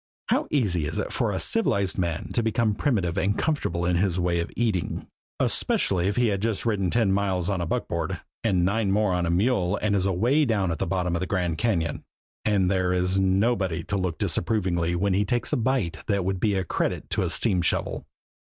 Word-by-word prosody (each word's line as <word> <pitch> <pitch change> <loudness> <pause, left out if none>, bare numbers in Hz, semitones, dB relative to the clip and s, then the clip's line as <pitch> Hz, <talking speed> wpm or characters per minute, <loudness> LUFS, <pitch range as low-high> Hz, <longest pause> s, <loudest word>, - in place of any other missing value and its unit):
How - - +1
easy 90 - +1
it - - -4
is - - 0
for - - 0
civilized 100 -1 0
man 85 -3 -2
to 120 - +2
become 110 -1 +1
primitive 100 - 0
and 100 +2 0
comfortable 140 - -1
in 90 0 +2
his 90 -1 +1
way 85 -1 +1
of 85 - -2
eating, 110 -7 -1 0.3
especially 90 -2 +1
if 100 - 0
he 120 -2 +3
has 100 -2 0
just 110 +1 -1
ridden 100 -5 +1
ten 110 -1 +2
miles 95 -2 0
on 95 -3 -1
a 85 - -2
buckboard - - -2 0.2
and 95 -6 +2
nine 100 +2 +1
more 105 -1 +2
on 90 -1 0
a - - 0
mule 95 0 +1
and 105 -1 +1
is 95 -1 +1
away 120 - +2
down 105 - +1
at 80 - -3
the 95 - -1
bottom 90 -1 0
of - - 0
the 95 - -3
Grand 90 -5 -1
Cañon 85 -10 0 0.4
and 100 -3 +2
there 95 -1 +1
is 90 +1 +1
nobody 95 -3 +1
to 100 - -3
look 90 -4 -1
on - - -2
disapprovingly 85 -4 0
when 100 +2 +1
he 100 +2 +2
takes 120 +4 -1
a - - +5
bite 120 -7 0
that 100 -3 0
would 95 0 -1
be 105 0 +1
a 95 - 0
credit 85 - -2
to - - +1
a - - 0
steam 90 -3 +1
shovel! 85 - -1
95 Hz, 220 wpm, -25 LUFS, 90-105 Hz, 0.4 s, a